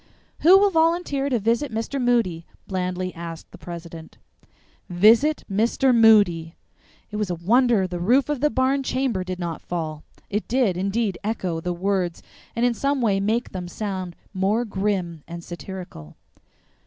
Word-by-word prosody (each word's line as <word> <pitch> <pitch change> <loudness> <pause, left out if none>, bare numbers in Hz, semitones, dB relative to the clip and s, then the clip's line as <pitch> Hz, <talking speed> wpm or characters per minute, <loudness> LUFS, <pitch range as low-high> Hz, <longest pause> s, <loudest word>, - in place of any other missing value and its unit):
"Who 360 +5 +7
will 400 0 +4
volunteer 325 -4 +1
to 250 - +1
visit 235 +6 0
Mr. 230 +5 -3
Moody?" 230 -10 +1 0.2
blandly 185 -1 -3
asked 165 -1 -8
the - - -13
president. 170 -2 -9 0.7
VISIT 225 +12 +4
MR. 230 +6 +2
MOODY! 200 -8 +4 0.6
It 210 - -4
was 210 -3 -1
a 175 - -1
wonder 225 +4 +3
the 180 -1 -5
roof 245 +10 +3
of 295 -3 -2
the 300 +3 +2
barn 265 0 +1
chamber 255 -7 -1
did 185 0 -5
not 170 -2 -4
fall; 155 -3 -4 0.2
it 210 +1 -3
did, 240 -6 +1
indeed 195 +1 -1
echo 185 -6 -2
the 180 - -2
words 180 -1 -1 0.3
and 235 +1 +1
in 245 - +2
some 280 +4 0
way 210 -5 +2
make 220 +5 -1
them 180 -2 -5
sound 185 -2 -5 0.2
more 205 +5 +1
grim 190 -5 -2
and 170 0 -8
satirical. 175 - -9
200 Hz, 155 wpm, -23 LUFS, 175-245 Hz, 0.7 s, Who